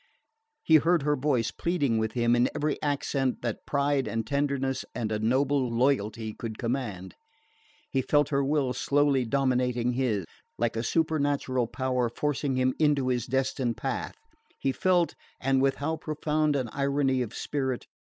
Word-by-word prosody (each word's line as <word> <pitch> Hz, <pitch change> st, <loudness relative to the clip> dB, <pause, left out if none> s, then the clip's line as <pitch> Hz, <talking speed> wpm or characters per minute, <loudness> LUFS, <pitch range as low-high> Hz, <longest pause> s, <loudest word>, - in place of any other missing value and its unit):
He 160 Hz, -, +6 dB
heard 165 Hz, +1 st, +2 dB
her 150 Hz, 0 st, +2 dB
voice 130 Hz, -5 st, 0 dB
pleading 145 Hz, -10 st, 0 dB
with 110 Hz, 0 st, -1 dB
him 120 Hz, -1 st, +2 dB
in 120 Hz, +1 st, +3 dB
every 150 Hz, 0 st, -1 dB
accent 140 Hz, -3 st, -1 dB
that 120 Hz, -3 st, -4 dB
pride 140 Hz, -1 st, +1 dB
and 115 Hz, -1 st, -2 dB
tenderness 140 Hz, 0 st, -1 dB
and 115 Hz, -3 st, -2 dB
a 105 Hz, -, 0 dB
noble 130 Hz, +3 st, +1 dB
loyalty 115 Hz, -3 st, 0 dB
could 110 Hz, -1 st, -6 dB
command; 115 Hz, -7 st, -3 dB, 0.7 s
he 135 Hz, -, 0 dB
felt 145 Hz, +2 st, +2 dB
her 140 Hz, -1 st, +1 dB
will 135 Hz, -2 st, +1 dB
slowly 140 Hz, 0 st, +2 dB
dominating 125 Hz, -1 st, +1 dB
his, 120 Hz, -7 st, 0 dB, 0.3 s
like 115 Hz, 0 st, 0 dB
a 115 Hz, -, -1 dB
supernatural 145 Hz, -4 st, 0 dB
power 125 Hz, -1 st, -1 dB
forcing 145 Hz, +1 st, -1 dB
him 130 Hz, 0 st, +2 dB
into 145 Hz, -4 st, +2 dB
his 125 Hz, -1 st, -1 dB
destined 130 Hz, -2 st, -1 dB
path; -, -, -3 dB, 0.4 s
he 135 Hz, -, 0 dB
felt 175 Hz, +3 st, +2 dB, 0.3 s
and 135 Hz, 0 st, +2 dB
with 135 Hz, 0 st, +2 dB
how 160 Hz, +3 st, -2 dB
profound 155 Hz, -1 st, 0 dB
an 130 Hz, -4 st, -1 dB
irony 140 Hz, -2 st, +1 dB
of 115 Hz, -2 st, -4 dB
spirit! 130 Hz, -4 st, -2 dB
135 Hz, 155 wpm, -28 LUFS, 120-145 Hz, 0.7 s, He